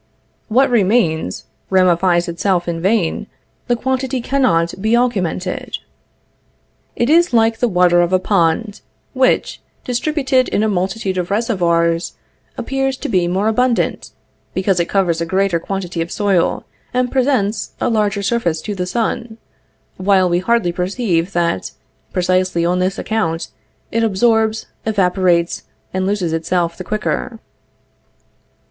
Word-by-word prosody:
What 260 +4 +3
remains, 195 -7 +1 0.2
ramifies 180 -1 +3
itself 175 +1 0
in 165 -1 -3
vain, 195 -2 0 0.4
the 245 - +2
quantity 260 +1 -1
cannot 235 -11 +1
be 220 +3 +3
augmented. 190 -7 -1 1.2
It 235 - +1
is 335 0 +4
like 225 -1 +3
the 245 - +2
water 180 -3 +4
of 175 +1 0
a 185 - +4
pond, 195 +3 0 0.3
which, 260 -1 +1 0.2
distributed 265 0 +1
in 210 - +1
a - - +2
multitude 190 0 -1
of 175 - -3
reservoirs, 175 -6 +1 0.4
appears 270 0 -1
to - - -5
be 185 -5 +2
more 190 +4 0
abundant, 240 +2 0 0.5
because 190 -1 +1
it 170 - 0
covers 175 -4 +1
a - - 0
greater 190 -1 +1
quantity 180 -2 -4
of 165 - -4
soil, 195 -4 +1 0.3
and 250 -1 +1
presents 250 -6 0
a - - 0
larger 210 -3 0
surface 195 -8 0
to 210 - -3
the 180 -2 -3
sun, 230 +1 -2 0.6
while 190 -1 +3
we 175 0 +1
hardly 195 -2 +1
perceive 180 -1 -1
that, 170 - -1 0.4
precisely 185 -1 +1
on 180 +1 +1
this 185 +1 0
account, 170 -7 -2 0.4
it 230 0 +1
absorbs, 220 +1 +2 0.2
evaporates, 180 -4 +1 0.3
and 185 0 -1
loses 190 -5 -1
itself 170 +1 -1
the 185 - -7
quicker. 215 +4 -3
195 Hz, 135 wpm, -18 LUFS, 175-230 Hz, 1.2 s, is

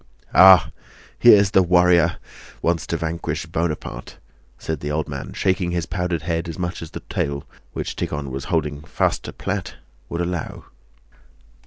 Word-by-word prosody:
"Ah! 95 -1 +8 0.5
here's 100 -5 +7
the 95 - +5
warrior! 90 -1 +4 0.5
Wants 85 0 0
to 85 - -1
vanquish 85 +1 -3
Buonaparte?" 75 -7 -4 0.4
said 80 -2 -4
the 75 - -4
old 75 +1 -1
man, 70 -4 -6
shaking 95 -2 0
his 85 -1 -1
powdered 90 -3 -2
head 85 0 -2
as 80 - -6
much 90 0 -4
as 80 - -7
the - - -8
tail, 70 0 -3 0.3
which - - -4
Tíkhon 70 -2 -4
was 65 +1 -5
holding 75 -4 -1
fast 80 - -1
to - - -5
plait, - - -4 0.3
would 85 - -3
allow. 85 -2 -4
85 Hz, 155 wpm, -22 LUFS, 75-90 Hz, 0.5 s, Ah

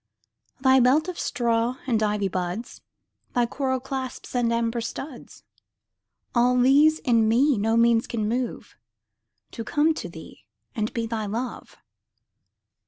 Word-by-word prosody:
Thy 265 0 +5
belt 270 +7 +3
of 365 -2 -5
straw 235 0 0
and 230 -4 +1
ivy 210 -2 +1
buds, 185 +5 -4 0.5
Thy 245 -1 +3
coral 260 +1 -2
clasps 260 0 -6
and 240 -2 +1
amber 230 0 0
studs, 260 +3 -8 0.9
All 245 +1 +3
these 290 +5 +5
in 230 -7 +2
me 265 +5 +3
no 225 +2 +1
means 230 0 +3
can 220 -3 -2
move 245 +2 -3 0.8
To 230 - -6
come 295 +7 +2
to - - -6
thee - - -12 0.3
and 215 -1 -1
be 230 -2 -2
thy 220 -2 -3
love. 235 +5 -5
240 Hz, 135 wpm, -25 LUFS, 225-260 Hz, 0.9 s, Thy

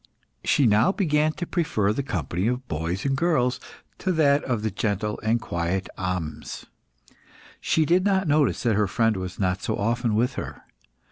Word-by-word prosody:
She 140 - +3
now 110 - +4
began 155 -6 +1
to 175 - -4
prefer 110 - 0
the 140 - -1
company 100 -7 -2
of 125 +1 -2
boys 85 +3 -3
and 135 -1 +1
girls 135 -5 +1 0.4
to 190 - 0
that 145 -3 +3
of 120 -5 -1
the 110 - 0
gentle 105 +1 -2
and 110 +2 +1
quiet 90 -1 -2
Ahmes. 90 -5 -4 0.9
She 160 - +2
did 180 +4 +3
not 190 -2 +2
notice 150 -1 +2
that 120 -3 +2
her 105 0 +2
friend 115 +2 +1
was 95 -1 -5
not 95 -1 0
so - - -1
often 115 +1 0
with 120 +3 +1
her. - - -9
115 Hz, 175 wpm, -25 LUFS, 100-150 Hz, 0.9 s, now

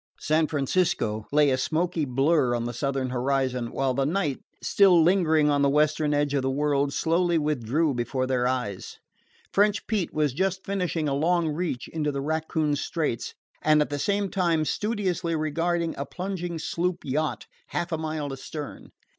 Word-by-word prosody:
San 155 +1 +2
Francisco 145 - 0
lay 145 -1 +4
a 130 - +1
smoky 165 0 0
blur 135 0 +2
on 120 - -2
the 120 +1 -3
southern 135 0 -2
horizon, 125 -1 0
while 135 -1 0
the 135 +2 0
night, 150 -2 0 0.2
still 190 -4 +5
lingering 160 -4 +3
on 145 0 +2
the 140 - +4
western 150 +1 +2
edge 145 -1 +1
of 140 - +2
the 130 - 0
world, 140 0 +1
slowly 170 +3 +1
withdrew 150 0 0
before 125 +2 -1
their 125 -1 +1
eyes. 125 -7 -3 0.6
French 205 +1 +2
Pete 205 -6 -1
was 150 -4 0
just 190 +4 -1
finishing 180 -5 -1
a 140 - 0
long 165 +3 +2
reach 150 -5 -3
into 150 -2 -2
the 140 - -3
Raccoon 155 0 0
Straits, 150 -4 -2 0.3
and 155 0 +4
at 150 - 0
the 145 - -2
same 200 +4 0
time 170 -5 +1
studiously 185 -5 -1
regarding 165 +2 0
a 140 - -5
plunging 180 -1 -4
sloop 175 +2 -2
yacht 150 +3 -1 0.2
half 175 0 -3
a 160 - 0
mile 155 -3 -3
astern. 145 +2 -7
150 Hz, 170 wpm, -26 LUFS, 135-170 Hz, 0.6 s, still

